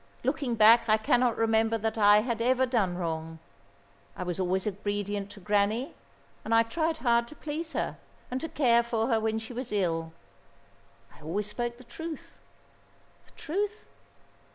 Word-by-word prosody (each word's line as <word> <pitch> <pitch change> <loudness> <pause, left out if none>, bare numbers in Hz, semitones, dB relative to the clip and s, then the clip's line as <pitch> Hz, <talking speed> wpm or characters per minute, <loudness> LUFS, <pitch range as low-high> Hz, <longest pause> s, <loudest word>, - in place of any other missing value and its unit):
Looking 250 -5 -1
back 230 +1 +6
I 215 - +5
cannot 240 +2 +2
remember 225 0 +2
that 220 0 -2
I 210 -1 +6
had 230 0 -2
ever 255 +2 +3
done 210 -8 0
wrong. 165 -2 -4 0.8
I - - -3
was 180 0 -3
always 185 0 0
obedient 205 0 -3
to 205 - -12
Granny, 210 +6 0 0.5
and 225 - +1
I 230 - +6
tried 315 +7 -1
hard 235 0 +3
to 300 - -12
please 310 +3 -5
her, - - -3 0.3
and 255 +1 -2
to 325 - -4
care 240 -5 +3
for 235 0 -1
her 225 -2 +3
when 220 0 -1
she 225 +2 -7
was 250 +1 -5
ill. 165 -5 -1 1.0
I - - -18
always 180 +7 -2
spoke 235 +3 -4
the 255 - -14
truth. 325 +5 -8 0.9
The - - -22
truth? 410 +6 -3
225 Hz, 165 wpm, -28 LUFS, 205-245 Hz, 1.0 s, back